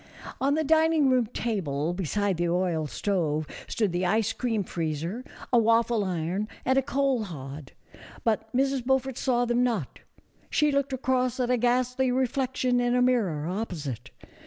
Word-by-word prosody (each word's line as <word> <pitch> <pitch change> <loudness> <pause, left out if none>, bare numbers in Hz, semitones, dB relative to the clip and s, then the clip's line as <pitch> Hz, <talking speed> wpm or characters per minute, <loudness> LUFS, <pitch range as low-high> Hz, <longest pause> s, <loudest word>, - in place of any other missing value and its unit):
On 280 +2 +2
the 315 - +1
dining 315 -2 +4
room 250 -3 +3
table, 175 - -2
beside 195 +1 -1
the 175 0 0
oil 170 -3 0
stove, 155 -4 -1 0.2
stood 215 -5 0
the 175 +1 -1
ice 215 +4 +1
cream 225 -5 -1
freezer, 165 - -3 0.3
a 240 - +7
waffle 230 0 +3
iron 185 +2 -2 0.2
and 260 - +3
a 270 - +4
coal 270 -3 0
hod, 140 -4 -8 0.5
but 220 -1 0
Mrs. 270 0 +1
Beaufort 265 0 +1
saw 245 -2 +1
them 240 +1 +2
not; 225 - -2 0.5
she 300 -1 +2
looked 280 0 0
across 255 -1 0
at 250 -1 +1
a 250 - +3
ghastly 250 +2 +1
reflection 255 0 0
in 245 0 +1
a 250 - +3
mirror 200 -12 +1
opposite. 165 - -4
230 Hz, 160 wpm, -27 LUFS, 180-255 Hz, 0.5 s, a